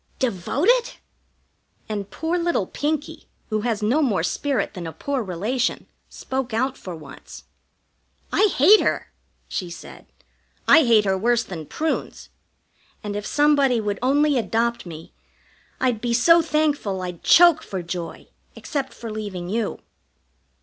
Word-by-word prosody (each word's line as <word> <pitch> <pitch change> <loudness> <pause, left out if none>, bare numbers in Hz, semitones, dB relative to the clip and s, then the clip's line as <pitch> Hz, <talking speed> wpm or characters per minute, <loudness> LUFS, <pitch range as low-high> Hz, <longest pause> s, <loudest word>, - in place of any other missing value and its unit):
Devoted!" 285 - +1 0.9
And 205 -2 -4
poor 325 +2 -2
little 340 - 0
Pinkie, 295 +7 -3 0.2
who 215 0 0
has 225 -2 -2
no 250 +9 +2
more 210 - +1
spirit 265 +3 -1
than 175 -3 -6
a - - -5
poor 280 - -3
relation, 220 +6 -2 0.2
spoke 260 -3 -4
out 260 +3 0
for 180 -8 -8
once. 150 -4 -12 0.9
"I - - +4
hate 390 +4 +6
her!" - - -1 0.4
she 180 -3 -4
said. 170 - -11 0.6
"I 320 - +7
hate 220 -3 +4
her 190 -1 +2
worse 235 +4 +1
than 160 -7 -8
prunes; 315 0 -3 0.7
and 205 -1 -4
if 205 0 -4
somebody 285 -4 +3
would 205 -2 -2
only 285 +1 +3
adopt 235 -2 -1
me, 160 -1 -10 0.7
I'd 245 -4 0
be 235 -1 0
so 335 +8 +6
thankful 295 - 0
I'd 180 -2 -6
choke 340 -2 +6
for 190 -3 -5
joy, 170 0 -6 0.3
except 275 -3 -4
for 230 -2 -7
leaving 200 -5 -5
you." 220 +1 -2
235 Hz, 140 wpm, -23 LUFS, 195-290 Hz, 0.9 s, I